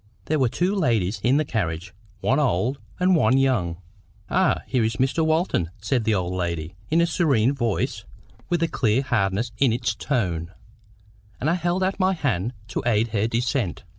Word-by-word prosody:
There 155 0 0
were 130 -3 +3
two 180 - 0
ladies 115 - 0
in 130 +4 +4
the 155 - +1
carriage, 90 - -3 0.3
one 130 +3 +2
old 130 0 +1 0.2
and 180 0 +4
one 135 -5 +4
young. 115 -11 +1 0.5
"Ah, - - +2
here 125 -3 0
is 110 0 0
Mr. 135 +8 +1
Walton!" 160 - +1
said 110 +3 0
the 110 - +2
old 90 -1 -1
lady, 85 -2 -3 0.2
in 165 +2 +3
a - - +4
serene 140 -8 +2
voice, 120 -6 -1 0.5
with 170 -1 +1
a - - +2
clear 120 -3 +1
hardness 100 -1 0
in 135 -4 +4
its 115 -1 0
tone; 90 - -2 0.9
and 150 +6 +1
I - - +3
held 175 +1 0
out 190 +1 -1
my 190 0 +3
hand 120 - -1 0.2
to - - -2
aid 115 -1 +2
her 110 0 0
descent. 120 - -1
120 Hz, 180 wpm, -24 LUFS, 100-150 Hz, 0.9 s, in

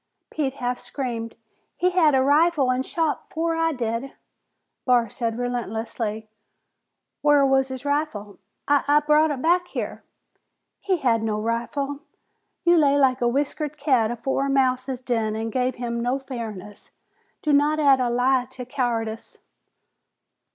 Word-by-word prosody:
Pete 275 -4 -2
half 245 -2 -2
screamed. 235 -4 -5 0.4
"He 365 +1 +2
had 320 -6 +4
a 260 - +3
rifle 290 -1 +3
an' 255 +1 0
shot 320 +3 -2
afore 330 +1 -1
I 325 0 +1
did!" 240 0 -3 0.7
Barr 245 -3 +3
said 230 +1 -3
relentlessly, 225 -2 -3 0.9
"Whar 290 -1 +5
was 270 -1 +3
his 260 +1 -7
rifle?" 285 -9 -2 0.3
"I 285 -1 +3
I 295 +1 +5
brought 300 +1 +3
it 275 -3 -3
back 355 +2 +3
here!" - - -5 0.8
"He 380 -2 0
had 235 -7 +1
no 215 -1 -1
rifle! 240 +6 -2 0.6
You 345 0 +5
lay 285 -2 +4
like 265 -3 +3
a 240 - +3
whiskered 290 +3 -2
cat 260 -7 +2
afore 265 +3 -1
a - - -2
mouse's 260 -1 0
den 225 -4 -1
an' 225 +1 -3
gave 255 0 0
him 235 -1 -3
no 245 +3 0
fairness. 220 -7 -8 0.5
Do 300 - +2
not 295 +2 +3
add 280 -3 +5
a 250 -1 +1
lie 250 +1 +2
to 250 -1 -8
cowardice." 235 -4 -3
260 Hz, 150 wpm, -24 LUFS, 235-290 Hz, 0.9 s, Whar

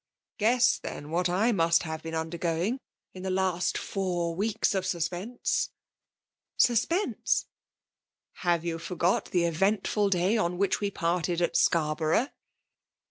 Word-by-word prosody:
Oaes8» 240 +3 +3
theii> 145 - -7
what 175 +1 +1
I 205 +7 +2
must 165 -5 +3
have 160 -1 -5
been 165 0 -5
under 160 +1 -3
going, 175 +10 0 0.3
in 185 - -9
the 190 - -3
last 185 -2 0
four 175 -4 -2
weeks 205 +5 0
of 190 -1 0
suspense! 180 +6 -1 0.3
*' - - -63
" - - -60
Suspense! 330 - +2 0.9
Hove 170 -2 0
you 165 -1 -2
forgot 175 +1 0
the 175 -2 0
eventful 195 +4 +1
day 190 +4 +2
on 175 -4 0
we 200 +1 +1
parted 175 -1 -1
at 175 - 0
Scarborough 160 - +2
180 Hz, 135 wpm, -28 LUFS, 170-200 Hz, 0.9 s, Oaes8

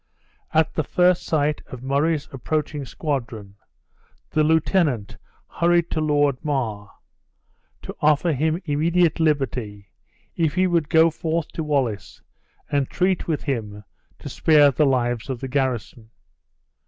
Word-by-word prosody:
At 160 0 +2
the 155 - -1
first 180 +3 +2
sight 150 -1 0
of 130 -1 -10
Murray's 145 +3 0
approaching 145 +2 -3
squadron, 115 -11 -4 0.8
the 155 - +2
lieutenant 155 - +1 0.3
hurried 170 0 +1
to 155 - -1
Lord 145 -3 +1
Mar, 115 -9 -2 0.9
to - - -7
offer 155 +2 +3
him 160 +4 0
immediate 165 +3 +1
liberty 125 -10 -1 0.4
if 160 -3 0
he 185 0 +3
would 170 -5 0
go 165 0 +5
forth 165 -1 -2
to 160 - -5
Wallace 135 - -2 0.5
and 140 -2 0
treat 185 0 0
with 155 -3 -2
him 105 -7 -4 0.3
to - - -10
spare 150 -3 +4
the 145 +3 +2
lives 120 -2 0
of 130 -3 -3
the 135 - -5
garrison. 125 -4 -3
145 Hz, 130 wpm, -22 LUFS, 125-160 Hz, 0.9 s, go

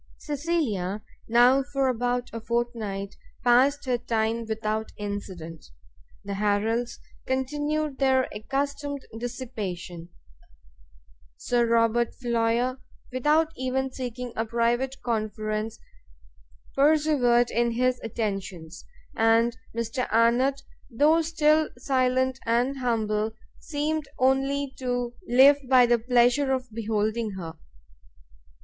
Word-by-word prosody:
Cecilia 265 - -2 0.2
now 245 +4 +5
for 275 -1 -1
about 245 0 -1
a 230 - -5
fortnight 225 -4 -3 0.3
passed 265 +4 +4
her 250 -2 0
time 230 0 -1
without 220 0 -2
incident; 190 -6 -6 0.6
the 200 - -4
Harrels 210 +4 0 0.3
continued 295 +2 -1
their 265 -1 +3
accustomed 280 +5 -3
dissipation, 205 -9 -6 1.3
Sir 240 -1 +1
Robert 230 0 +2
Floyer, 240 +1 0 0.3
without 300 +5 +2
even 260 +1 -2
seeking 250 -1 -5
a 225 - 0
private 235 +4 0
conference, 215 -1 -2 1.0
persevered 280 -5 +3
in 235 0 +1
his 255 +1 +1
attentions, 195 -7 -4 0.3
and 225 +1 +3 0.2
Mr 235 +2 -2
Arnott, 245 +5 +3 0.3
though 295 +7 +4
still 315 -1 +2
silent 260 0 +1
and 245 +4 +1
humble, 220 -3 0 0.3
seemed 305 -1 -2
only 270 +1 +1
to 245 -2 -2
live 265 +4 +7
by 255 -2 +7
the 240 0 +3
pleasure 245 +3 +3
of 255 -3 -4
beholding 220 0 -1
her. 170 -4 -6
240 Hz, 100 wpm, -26 LUFS, 225-265 Hz, 1.3 s, live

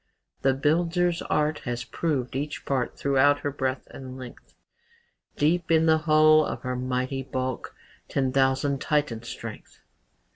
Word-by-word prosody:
"The 135 -1 +3
builder's 170 +4 +1
art 150 0 0
Has 120 -1 -3
proved 135 -2 -2
each 145 +2 -4
part 130 -3 -1
Throughout 140 +1 +3
her 145 - -2
breadth 130 -1 -2
and 130 -1 -9
length; 125 -2 -11 0.8
Deep 165 +3 +1
in 160 -1 +4
the 160 -1 +4
hulk, 155 0 +6
Of - - -6
her 125 0 -2
mighty 130 +1 -2
bulk, 130 -1 -4 0.3
Ten 135 -2 0
thousand 135 +1 +2
Titans' 120 -7 -1
strength." - - -9
140 Hz, 140 wpm, -26 LUFS, 130-155 Hz, 0.8 s, hulk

